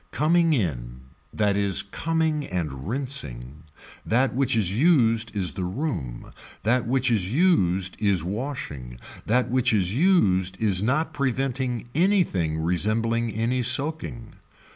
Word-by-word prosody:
Coming 165 Hz, +1 st, +2 dB
in, 65 Hz, -, -3 dB, 0.3 s
that 105 Hz, -2 st, 0 dB
is 100 Hz, -2 st, +1 dB
coming 160 Hz, +6 st, -1 dB
and 75 Hz, -6 st, -4 dB
rinsing, 75 Hz, -, -5 dB, 0.4 s
that 125 Hz, +4 st, +1 dB
which 130 Hz, -1 st, +1 dB
is 100 Hz, -4 st, 0 dB
used 115 Hz, -7 st, +2 dB
is 95 Hz, -5 st, +2 dB
the 95 Hz, +2 st, -5 dB
room, 90 Hz, -, -4 dB, 0.3 s
that 120 Hz, +2 st, +1 dB
which 130 Hz, 0 st, +1 dB
is 100 Hz, -4 st, 0 dB
used 95 Hz, -, +2 dB
is 100 Hz, -6 st, +1 dB
washing, 90 Hz, -, -6 dB, 0.3 s
that 125 Hz, +2 st, +1 dB
which 130 Hz, 0 st, +2 dB
is 95 Hz, -3 st, +1 dB
used 95 Hz, -, +2 dB
is 100 Hz, -4 st, +3 dB
not 140 Hz, +9 st, 0 dB
preventing 130 Hz, -2 st, -2 dB
anything 160 Hz, -, +1 dB
resembling 110 Hz, +7 st, 0 dB
any 115 Hz, +4 st, -1 dB
soaking. 130 Hz, -2 st, 0 dB
115 Hz, 125 wpm, -24 LUFS, 90-135 Hz, 0.4 s, is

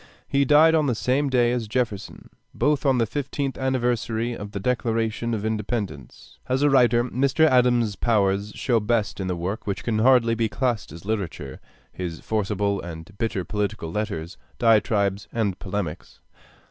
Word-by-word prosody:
He 140 Hz, 0 st, +2 dB
died 150 Hz, +4 st, +6 dB
on 155 Hz, -2 st, +3 dB
the 125 Hz, -, +1 dB
same 135 Hz, +5 st, +1 dB
day 120 Hz, -2 st, +3 dB
as 120 Hz, -3 st, -2 dB
Jefferson, 110 Hz, -4 st, -3 dB, 0.2 s
both 145 Hz, +3 st, +1 dB
on 135 Hz, -2 st, +3 dB
the 115 Hz, -, +2 dB
fiftieth 140 Hz, +2 st, -3 dB
anniversary 120 Hz, -3 st, -1 dB
of 105 Hz, -3 st, -7 dB
the 100 Hz, -, -4 dB
Declaration 115 Hz, 0 st, -1 dB
of 105 Hz, 0 st, -4 dB
Independence. 105 Hz, -, -4 dB
As 130 Hz, +2 st, +1 dB
a 145 Hz, -, +4 dB
writer, 120 Hz, -3 st, +4 dB
Mr. 135 Hz, +5 st, +2 dB
Adams's 120 Hz, -6 st, +3 dB
powers 100 Hz, -2 st, +1 dB
show 120 Hz, -3 st, +1 dB
best 105 Hz, -1 st, -1 dB
in 95 Hz, -, -2 dB
the 90 Hz, -, -1 dB
work 95 Hz, +7 st, -4 dB
which 100 Hz, -, -3 dB
can 110 Hz, -2 st, 0 dB
hardly 120 Hz, -1 st, +4 dB
be 115 Hz, -1 st, 0 dB
classed 120 Hz, -, -1 dB
as 85 Hz, +4 st, -11 dB
literature, 95 Hz, -10 st, -4 dB, 0.3 s
his 85 Hz, -3 st, -5 dB
forcible 100 Hz, -2 st, -1 dB
and 85 Hz, +2 st, -9 dB
bitter 100 Hz, -5 st, -1 dB
political 105 Hz, -3 st, -3 dB
letters, 95 Hz, -4 st, -4 dB, 0.2 s
diatribes, 105 Hz, -3 st, +2 dB
and 105 Hz, -5 st, -1 dB
polemics. 90 Hz, -4 st, -5 dB
110 Hz, 160 wpm, -24 LUFS, 100-125 Hz, 0.3 s, died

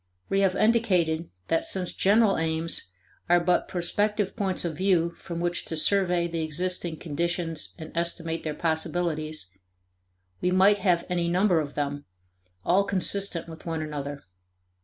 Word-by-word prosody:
We 195 Hz, -, +1 dB
have 190 Hz, -2 st, +2 dB
indicated 185 Hz, -8 st, +1 dB, 0.2 s
that 165 Hz, -, +1 dB
since 185 Hz, -2 st, -1 dB
general 205 Hz, +1 st, +3 dB
aims 160 Hz, +1 st, +4 dB, 0.4 s
are 175 Hz, 0 st, +5 dB
but 175 Hz, +1 st, +1 dB
prospective 205 Hz, +3 st, 0 dB
points 190 Hz, -3 st, -1 dB
of 165 Hz, -2 st, -3 dB
view 175 Hz, -1 st, +2 dB
from 170 Hz, -2 st, -7 dB
which 175 Hz, 0 st, -1 dB
to 160 Hz, -, -4 dB
survey 180 Hz, 0 st, +2 dB
the 165 Hz, -1 st, -3 dB
existing 170 Hz, +1 st, -1 dB
conditions 170 Hz, 0 st, -3 dB
and 160 Hz, -2 st, -9 dB
estimate 165 Hz, -1 st, -2 dB
their 155 Hz, -2 st, -4 dB
possibilities, 160 Hz, -, -1 dB, 1.0 s
we 180 Hz, -, +1 dB
might 190 Hz, +3 st, +4 dB
have 180 Hz, -3 st, +1 dB
any 175 Hz, -2 st, -1 dB
number 180 Hz, 0 st, +2 dB
of 145 Hz, -2 st, -5 dB
them, 145 Hz, 0 st, -3 dB, 0.6 s
all 190 Hz, +3 st, +3 dB
consistent 195 Hz, -2 st, 0 dB
with 160 Hz, 0 st, -11 dB
one 160 Hz, -1 st, -2 dB
another. 145 Hz, -2 st, -6 dB
170 Hz, 145 wpm, -26 LUFS, 160-185 Hz, 1.0 s, are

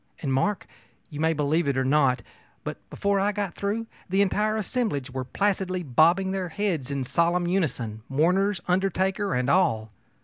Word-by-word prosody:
And, 135 Hz, -3 st, 0 dB
Mark, 190 Hz, +10 st, 0 dB, 0.5 s
you 150 Hz, -, -7 dB
may 160 Hz, +1 st, +3 dB
believe 150 Hz, +2 st, +1 dB
it 140 Hz, -2 st, +1 dB
or 130 Hz, -, +1 dB
not, 135 Hz, -2 st, +3 dB, 0.4 s
but -, -, -5 dB
before 200 Hz, 0 st, 0 dB
I 200 Hz, +2 st, +2 dB
got 200 Hz, -4 st, -3 dB
through 210 Hz, +3 st, -2 dB, 0.2 s
the 195 Hz, +2 st, +3 dB
entire 210 Hz, +2 st, +1 dB
assemblage 210 Hz, -, -2 dB
were 130 Hz, 0 st, -3 dB
placidly 185 Hz, +2 st, -1 dB
bobbing 170 Hz, +7 st, +3 dB
their 190 Hz, -2 st, -2 dB
heads 165 Hz, -7 st, -2 dB
in 140 Hz, -2 st, -2 dB
solemn 170 Hz, +6 st, +1 dB
unison, 125 Hz, -, -1 dB
mourners, 180 Hz, +7 st, +2 dB
undertaker, 190 Hz, 0 st, +1 dB
and 125 Hz, 0 st, 0 dB
all. 135 Hz, -, +2 dB
175 Hz, 165 wpm, -26 LUFS, 140-195 Hz, 0.5 s, may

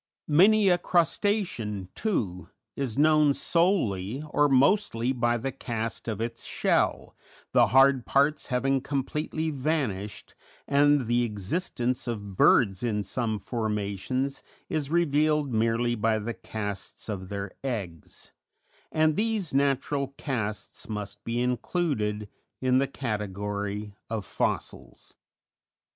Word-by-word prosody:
Many 200 Hz, +7 st, +5 dB
a 175 Hz, -1 st, +4 dB
crustacean, 170 Hz, -, 0 dB
too, 100 Hz, -, -2 dB, 0.3 s
is 135 Hz, -5 st, -3 dB
known 150 Hz, -1 st, +5 dB
solely 135 Hz, -, +1 dB
or 145 Hz, 0 st, +3 dB
mostly 135 Hz, -, +3 dB
by 120 Hz, -1 st, +1 dB
the 135 Hz, +3 st, -3 dB
cast 115 Hz, -4 st, -4 dB
of 110 Hz, -3 st, -3 dB
its 115 Hz, +1 st, -4 dB
shell, -, -, 0 dB, 0.4 s
the -, -, +5 dB
hard 135 Hz, -1 st, +5 dB
parts 140 Hz, +2 st, +2 dB
having 135 Hz, +1 st, +1 dB
completely 150 Hz, +3 st, -2 dB
vanished, 130 Hz, -9 st, -2 dB, 0.3 s
and 145 Hz, -1 st, +4 dB
the 120 Hz, +2 st, +2 dB
existence 120 Hz, -, -2 dB
of 105 Hz, -4 st, -4 dB
birds 95 Hz, -1 st, +4 dB
in 105 Hz, -4 st, 0 dB
some 110 Hz, -1 st, -1 dB
formations 110 Hz, +4 st, -2 dB, 0.3 s
is 150 Hz, -3 st, -2 dB
revealed 150 Hz, -4 st, +2 dB
merely 115 Hz, +2 st, +1 dB
by 110 Hz, -1 st, +1 dB
the 110 Hz, +2 st, -3 dB
casts 105 Hz, -3 st, -6 dB
of 95 Hz, -4 st, -5 dB
their 100 Hz, -1 st, -4 dB
eggs; 100 Hz, -, -6 dB, 0.6 s
and 155 Hz, -1 st, +3 dB
these 215 Hz, -6 st, 0 dB
natural 140 Hz, 0 st, 0 dB
casts 110 Hz, -6 st, -4 dB
must 105 Hz, -2 st, -5 dB
be 115 Hz, +1 st, -2 dB
included 125 Hz, -, -1 dB, 0.3 s
in 130 Hz, 0 st, +3 dB
the 135 Hz, -, +1 dB
category 105 Hz, -4 st, -4 dB, 0.2 s
of 110 Hz, -3 st, -3 dB
fossils. -, -, -3 dB
125 Hz, 115 wpm, -27 LUFS, 105-145 Hz, 0.6 s, Many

